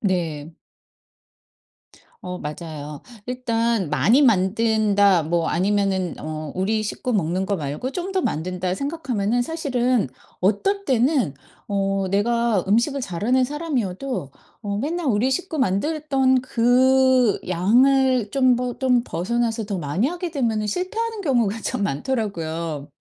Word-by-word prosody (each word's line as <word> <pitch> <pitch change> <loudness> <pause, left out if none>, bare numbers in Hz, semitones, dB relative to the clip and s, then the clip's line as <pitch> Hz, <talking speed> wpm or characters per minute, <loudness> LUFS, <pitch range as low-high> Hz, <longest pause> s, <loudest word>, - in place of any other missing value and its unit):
네. 165 -5 -2 1.7
어 180 0 -5
맞아요. 150 -1 -7 0.2
일단 230 -6 -1
'많이 230 - +4
만든다.' 205 - +3
뭐 165 +1 0
아니면은 190 -1 0
어 155 -1 -5
'우리 215 +4 0
식구 245 +3 -3
먹는 185 -1 0
거 200 - 0
말고 150 - -4
좀 355 +4 -4
더 375 - +2
만든다.' 180 +3 -2
생각하면은 245 -6 -1
사실은 250 - 0 0.3
어떨 390 - +1
때는 255 - +2 0.3
어 195 -1 0
내가 230 0 +1
음식을 240 +7 +2
잘하는 245 +6 +1
사람이어도 255 - -3 0.3
어 200 -2 -3
맨날 310 +6 -2
우리 230 +2 +2
식구 320 +3 -2
만들던 265 - +1
그 255 0 +3
양을 245 +5 +3
좀 255 -2 +4
버 245 0 -3
좀 250 -3 +3
벗어나서 225 +3 -1
더 200 -1 -3
많이 175 - 0
하게 350 0 -4
되면은 230 -7 0
실패하는 430 - -2
경우가 235 - +1
참 205 - -2
많더라고요. 165 - -3
225 Hz, 260 characters per minute, -22 LUFS, 185-260 Hz, 1.7 s, 많이